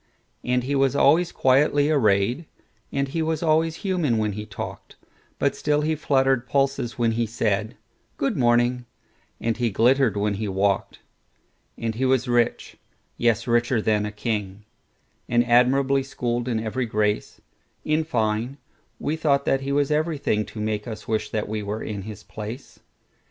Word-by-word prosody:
And 125 0 +1
he 135 +3 -2
was 135 0 +2
always 165 +5 +4
quietly 145 +3 +3
arrayed, 120 +3 +2 0.4
And 140 0 0
he 165 +4 -2
was 160 0 -1
always 160 0 +2
human 170 - +1
when 105 -1 0
he 105 +1 -6
talked; 100 - -8 0.4
But - - +1
still 150 0 +1
he 155 +1 0
fluttered 135 -4 +1
pulses 135 -2 0
when 115 -2 +2
he 115 0 0
said,"Good 110 +4 -3
morning," 120 0 +2 0.5
and 115 -1 -1
he 120 -1 +1
glittered 120 +2 +3
when 105 0 0
he 105 +2 -3
walked. 100 0 -1 0.8
And 115 -1 -2
he 125 +4 -1
was 130 -1 +2
rich,—yes, 120 -1 -1
richer 120 0 +2
than 105 -1 +1
a - - -5
king,—And 105 +2 -4
admirably 130 +3 +3
schooled 120 -2 -3
in 115 -3 0
every 115 +3 -2
grace:In 110 +8 -2
fine, 115 -2 -1 0.4
we 150 - -2
thought 140 -3 +1
that 135 - +1
he 135 +1 -3
was 145 +1 +1
everythingTo 150 -9 -1
make 105 0 -2
us 110 -2 -7
wish 110 -1 -1
that 110 -1 -2
we 110 0 -3
were 105 +2 -4
in 105 -2 -4
his 105 0 -9
place. 110 +5 -8
120 Hz, 150 wpm, -24 LUFS, 110-140 Hz, 0.8 s, always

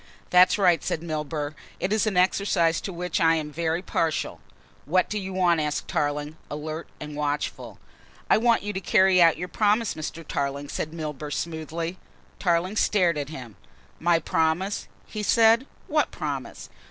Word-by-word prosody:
"That's 180 +1 +6
right," 180 -4 +3
said 160 - -2
Milburgh, 150 -2 -3 0.3
"it 190 +3 0
is 215 0 +2
an 200 -4 0
exercise 180 -3 +2
to 195 - -5
which 180 -1 -2
I 165 0 +5
am 150 -2 -3
very 165 +2 -1
partial." 165 -3 -1 0.5
"What 180 +5 +2
do 210 - -1
you 190 -1 -5
want?" 180 -3 +2
asked 150 -1 -2
Tarling, 145 +1 -2
alert 155 +2 -5
and 150 0 -7
watchful. 145 0 -3 0.5
"I - - +4
want 235 -1 +3
you 205 0 -3
to 190 - -3
carry 190 -1 +4
out 165 -3 +6
your 180 +2 -4
promise, 215 +2 +1
Mr. 155 0 -6
Tarling," 140 0 -2
said 155 - -3
Milburgh 150 -2 -5
smoothly. 165 +2 -4 0.4
Tarling 180 +3 +1
stared 180 -7 +3
at 145 0 -4
him. 125 -8 -9 0.4
"My 170 +1 +3
promise," 165 +4 0 0.2
he 215 - -5
said, 230 +4 +4 0.2
"what - - +1
promise?" - - -5
170 Hz, 165 wpm, -25 LUFS, 155-190 Hz, 0.5 s, That's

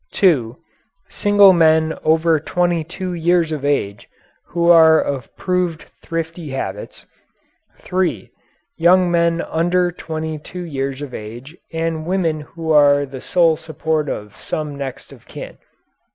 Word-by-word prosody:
(2) 135 - +2 0.5
Single 205 -2 +5
men 160 -2 +3
over 160 0 +3
twenty 175 +1 0
two 180 +3 -6
years 170 -1 +1
of 150 -3 -4
age 105 -9 -1 0.4
who 170 0 -1
are 160 -2 +7
of 135 -4 -3
proved 180 -3 -1 0.2
thrifty 165 -1 -5
habits. 105 -7 -6 0.7
(3) 180 - -2 0.5
Young 180 +1 +4
men 170 0 +1
under 175 +2 0
twenty 160 -2 -5
two 180 +4 -8
years 135 -3 -4
of 135 -3 -8
age, 120 +8 -9 0.2
and 165 -1 -3
women 175 -4 0
who 160 +2 -5
are 145 -1 +5
the 130 -1 -9
sole 170 -3 +3
support 160 -1 -2
of 105 -1 -6
some 150 -2 -4
next 135 -2 -7
of - - -18
kin. - - -9
160 Hz, 135 wpm, -19 LUFS, 145-175 Hz, 0.7 s, are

